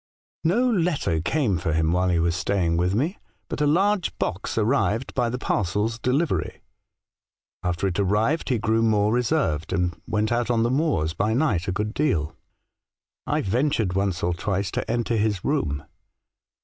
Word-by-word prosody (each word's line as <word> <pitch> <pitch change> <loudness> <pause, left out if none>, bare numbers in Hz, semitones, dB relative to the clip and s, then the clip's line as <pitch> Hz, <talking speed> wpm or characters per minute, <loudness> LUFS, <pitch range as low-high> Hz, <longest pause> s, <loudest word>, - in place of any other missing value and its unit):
" - - -79
No 245 +4 +3
letter 165 - +1
came 105 - 0
for 80 -2 -1
him 80 0 +2
while 90 +1 +2
he 90 - +2
was 85 0 +1
staying 90 -3 0
with 90 +3 +1
me, 155 - -1 0.3
but - - -4
a 150 - +3
large 190 +3 +1
box 95 - -3
arrived 115 +1 +1
by 120 -2 +1
the 125 - -3
parcels 105 0 -1
delivery. 135 +8 -1 1.0
After 90 0 -1
it 95 0 -1
arrived 105 - +1
he 125 - +2
grew 110 +1 +1
more 105 -1 +2
reserved, 120 - 0
and 85 -2 -1
went 110 +1 0
out 120 0 0
on 115 -2 +2
the 120 - +1
moors 130 - +1
by 105 +5 0
night 125 - +1
a - - 0
good 105 +3 -2
deal. 85 - 0 0.9
I - - +1
ventured 115 -2 0
once 95 -2 -1
or 85 +1 +1
twice 95 +2 -2
to - - -3
enter 120 0 0
his 105 -3 0
room. 75 - -1
105 Hz, 175 wpm, -24 LUFS, 90-125 Hz, 1.0 s, No